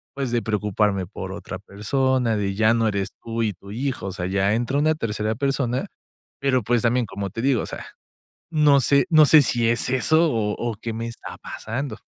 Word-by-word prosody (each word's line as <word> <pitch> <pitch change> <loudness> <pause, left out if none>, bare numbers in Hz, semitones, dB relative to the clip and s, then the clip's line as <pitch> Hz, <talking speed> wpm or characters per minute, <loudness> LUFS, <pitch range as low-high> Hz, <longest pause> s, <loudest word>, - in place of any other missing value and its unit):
pues, 135 -3 -2
de 120 -1 +1
preocuparme 105 -3 0
por 95 0 -7
otra 95 -2 -7
persona, 115 +4 0
de 100 -1 -2
ya 110 +2 +4
no 115 -1 +2
eres 100 -2 -1
tú 115 0 -3
y 110 - +1
tu 100 +3 -15
hijo, 120 -2 -3
o - - -3
sea, 90 -2 -4
ya 100 +2 +1
entra 120 +4 0
una 155 +2 +2
tercera 110 -4 -2
persona, 135 -1 -1 0.5
pero, 130 -3 +1
pues, 120 +2 +1
también, 120 +1 +2
como 100 -1 -5
te 115 - -5
digo, 130 -2 +2
o - - -4
sea, - - -7 0.7
no 150 -3 +4
sé 140 +5 +3
no 155 -2 +7
sé 155 0 +7
si 120 -2 +1
es 120 +1 0
eso, 155 +5 +3
o 105 -2 0
o, 120 -1 -2
¿qué 115 - -4
me 115 +1 -4
está 115 -1 -8
pasando? 115 +1 -5
115 Hz, 210 wpm, -23 LUFS, 105-130 Hz, 0.7 s, no